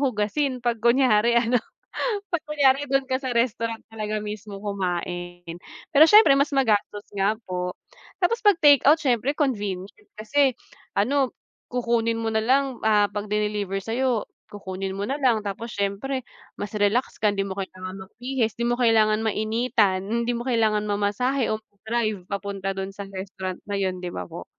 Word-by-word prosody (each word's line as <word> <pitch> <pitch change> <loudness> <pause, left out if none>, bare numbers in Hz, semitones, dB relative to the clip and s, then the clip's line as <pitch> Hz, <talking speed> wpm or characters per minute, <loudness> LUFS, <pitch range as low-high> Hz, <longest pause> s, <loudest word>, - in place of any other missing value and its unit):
hugasin 255 +2 0
kapag 235 -2 -1
kunyari 235 -1 +4
ano 235 0 +3 0.7
kapag 345 -4 -1
kunyari 285 -2 +3
dun 270 0 +2
ka 260 - +2
sa 260 -2 -3
restaurant 230 -1 0
talaga 215 -1 -3
mismo 210 -1 -7
kumain. 175 -3 -4 0.4
Pero 300 +2 +8
siyempre 325 -7 +7
mas 280 +1 +1
magastos 210 -5 +1
nga 200 +1 +2
po. 180 0 -3 0.5
Tapos 415 +6 +2
kapag 410 -6 +4
takeout 290 0 +7
siyempre 255 +1 +1
convenient 205 - -1 0.3
kasi 265 +5 +2 0.4
ano 265 +5 +2 0.4
kukunin 235 -2 +1
mo 225 - -1
na 220 - +2
lang, 265 +2 +2
ah, 210 -2 +4
kapag 205 0 -5
diniliver 210 -2 -1
sa 225 - -5
iyo 255 -4 0 0.2
kukunin 195 -1 -5
mo 200 - -3
nalang 250 -2 +1
tapos 210 +3 -5
siyempre 205 +7 -2 0.3
mas 205 - -5
relax 210 +5 +1
ka 215 - +2
hindi 195 -1 -1
mo 195 - -6
kailangan 185 -1 -6
magbihis, 245 0 -2
di 235 - -3
mo 240 0 +1
kailangan 220 -3 +4
mainitan, 215 -3 +1
hindi 235 +2 0
mo 240 +2 -5
kailangan 220 -4 +2
mamasahe, 210 +6 0
o 215 - -1
mag-drive 215 -1 -3
papunta 200 -1 -3
dun 195 0 -4
sa 200 - -6
restaurant 190 -1 -6
na 205 - -2
yun 190 -2 -1
'di 180 - -5
ba 90 - -4
po? - - -8
220 Hz, 160 wpm, -24 LUFS, 200-255 Hz, 0.7 s, Pero